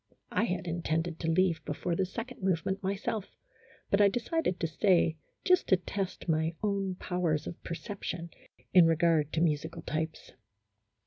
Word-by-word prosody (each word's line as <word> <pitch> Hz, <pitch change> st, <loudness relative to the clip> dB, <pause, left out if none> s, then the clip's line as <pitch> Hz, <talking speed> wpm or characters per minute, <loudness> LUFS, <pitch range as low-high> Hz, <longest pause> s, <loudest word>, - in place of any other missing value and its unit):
I -, -, +2 dB
had 180 Hz, -4 st, -2 dB
intended 165 Hz, -1 st, -1 dB
to 165 Hz, -, -1 dB
leave 175 Hz, 0 st, +2 dB
before 170 Hz, +4 st, -2 dB
the 190 Hz, +1 st, 0 dB
second 235 Hz, +5 st, -7 dB
move 185 Hz, -4 st, +1 dB
ment 190 Hz, 0 st, -1 dB
myself, 200 Hz, +1 st, -3 dB, 0.5 s
but 200 Hz, -, +4 dB
I 205 Hz, -, +8 dB
decided 235 Hz, -, 0 dB
to -, -, 0 dB
stay 165 Hz, 0 st, +3 dB, 0.3 s
just 365 Hz, -1 st, +4 dB
to 190 Hz, -, +5 dB
test 190 Hz, +2 st, -4 dB
my 160 Hz, 0 st, +1 dB
own 195 Hz, -2 st, 0 dB
powers 175 Hz, -5 st, -1 dB
of 170 Hz, -, -7 dB
perception 170 Hz, -2 st, -5 dB, 0.4 s
in 180 Hz, -3 st, +8 dB
regard 165 Hz, -2 st, +3 dB
to 160 Hz, -, +1 dB
musical 160 Hz, 0 st, 0 dB
types. 160 Hz, +1 st, -3 dB
175 Hz, 155 wpm, -30 LUFS, 165-195 Hz, 0.5 s, I